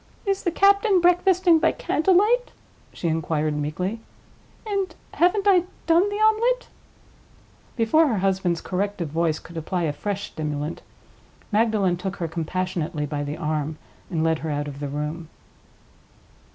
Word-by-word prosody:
"Is 390 -1 0
the 350 - 0
captain 400 +2 +4
breakfasting 355 -1 +4
by - - +3
candle 360 +5 +1
light?" 480 +6 +3 0.4
she 170 - -4
inquired, 155 -1 0
meekly. 175 +9 -3 0.7
"And 395 -3 -2 0.2
haven't 375 +4 +2
I 365 -3 +5 0.2
done 340 +4 +4
the 410 - -4
omelette?" 440 +4 +2 1.1
Before 265 +8 +3
her 230 -6 0
husband's 185 -3 0
corrective 190 -3 -2
voice 160 0 0
could 165 0 -11
apply 175 +2 -2
a 150 -3 0
fresh 200 +3 -3
stimulant, 150 0 -4 0.7
Magdalen 210 -4 +2
took 190 +2 -4
her 170 -4 -3
compassionately 170 -1 -3
by 145 0 -3
the 145 +2 -4
arm 155 -1 -2 0.3
and 165 -4 -1
led 160 -1 +1
her 160 - -4
out 145 0 -2
of 140 -1 -7
the 145 -1 -4
room. 150 +3 -4
185 Hz, 145 wpm, -24 LUFS, -, 1.1 s, I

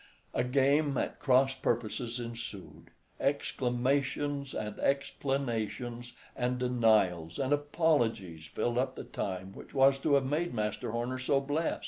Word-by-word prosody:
A - - +1
game 140 +2 +2
at - - -2
cross 135 -1 +4
purposes 120 -1 -2
ensued; 115 -4 -7 0.3
exclamations 140 +1 0
and 105 -1 -4
explanations, 120 -3 -1 0.2
and 125 0 0
denials 110 -10 +2
and 135 +1 +1
apologies 120 - 0
filled 120 +9 -1
up 130 0 -1
the - - -6
time 95 -1 -4
which - - -12
was 135 0 +5
to 145 +1 +3
have 135 -1 +3
made 150 +2 -1
Master 105 0 -2
Horner 120 +3 -2
so 135 +2 +2
blest. 145 +4 -1
125 Hz, 130 wpm, -31 LUFS, 115-140 Hz, 0.3 s, was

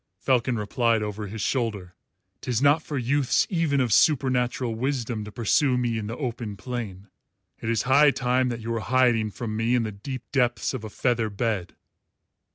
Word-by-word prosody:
Falcon 125 -2 +1
replied 115 +1 +1
over 105 0 -4
his 105 +2 -6
shoulder, 105 -9 -2 0.5
"'Tis 120 -3 -1
not 145 +3 +4
for 150 -2 -5
youths 130 +2 +2
even 165 -6 +1
of 125 -5 +1
supernatural 125 -4 +2
wisdom 120 -2 -2
to 105 - -9
pursue 125 +4 +2
me 120 -2 0
in 105 - -5
the 115 - -5
open 115 -6 -4
plain. 105 -4 -6 0.5
It 110 - -4
is 115 -2 +1
high 140 +4 +5
time 125 -1 +1
that 120 -1 -4
you 115 +1 -4
were 115 - -1
hiding 120 -2 +2
from 110 +1 -5
me 115 +3 +1
in 120 - +2
the 110 - -3
deep 125 +6 -7
depths 120 -5 +1
of 130 -4 -5
a 110 - -6
feather 115 0 0
bed." 100 -4 -2
120 Hz, 180 wpm, -25 LUFS, 110-130 Hz, 0.5 s, high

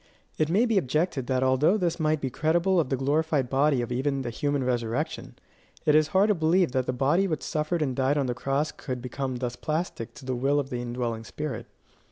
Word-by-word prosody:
It 155 0 +2
may 205 +8 +3
be 225 -4 +3
objected 150 -3 -1
that 130 0 +1
although 130 +9 +3
this 175 -4 -1
might 155 -1 +1
be 130 - -2
credible 170 +6 +2
of 155 - 0
the 135 - 0
glorified 145 -1 0
body 135 -2 +3
of 120 - -6
even 135 +2 -1
the 120 - -3
human 145 +1 -1
resurrection, 120 -3 -2 0.5
it 150 - +4
is 155 0 +5
hard 190 +6 +3
to - - +5
believe 170 -1 +2
that 130 -1 -1
the - - +1
body 145 +10 +2
which 160 -4 -2
suffered 155 +1 -1
and 130 -4 -2
died 135 +3 +1
on 140 - +1
the 125 - -1
cross 140 +4 -1
could 130 -2 -5
become 130 +1 -4
thus 120 -1 -3
plastic 155 -3 -3
to - - -12
the 130 - -1
will 140 +4 +2
of 140 -1 -4
the 120 -1 -2
indwelling 120 -2 -3
spirit. 150 +5 -5
140 Hz, 225 wpm, -27 LUFS, 130-160 Hz, 0.5 s, is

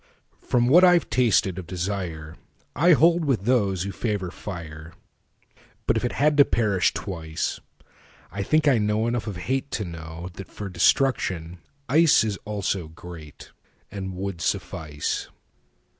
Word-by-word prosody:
From 120 -1 +1
what 170 +8 +6
I've 175 -1 +5
tasted 100 -7 +2
of 90 - -9
desireI 90 - -1
hold 170 +3 +4
with 135 -9 +1
those 100 -7 +2
who 100 - -4
favor 100 -5 -3
fire. 85 -5 -8 0.9
But - - +2
if 110 - -1
it 125 - -1
had 150 +1 +2
to 140 - +9
perish 100 -7 +1
twice,I 85 +1 -7
think 155 +8 +2
I 130 -5 +5
know 105 +1 +1
enough 120 -1 -2
of 105 - -4
hateTo 130 +2 -2
know 85 0 -8
that 95 - -9
for 100 -1 -7
destruction 90 -3 +1 0.3
iceIs 140 -9 +4
also 100 -4 -2
greatAnd 85 +4 -11
would 95 -1 -5
suffice. 80 -4 -3
100 Hz, 130 wpm, -24 LUFS, 85-120 Hz, 0.9 s, to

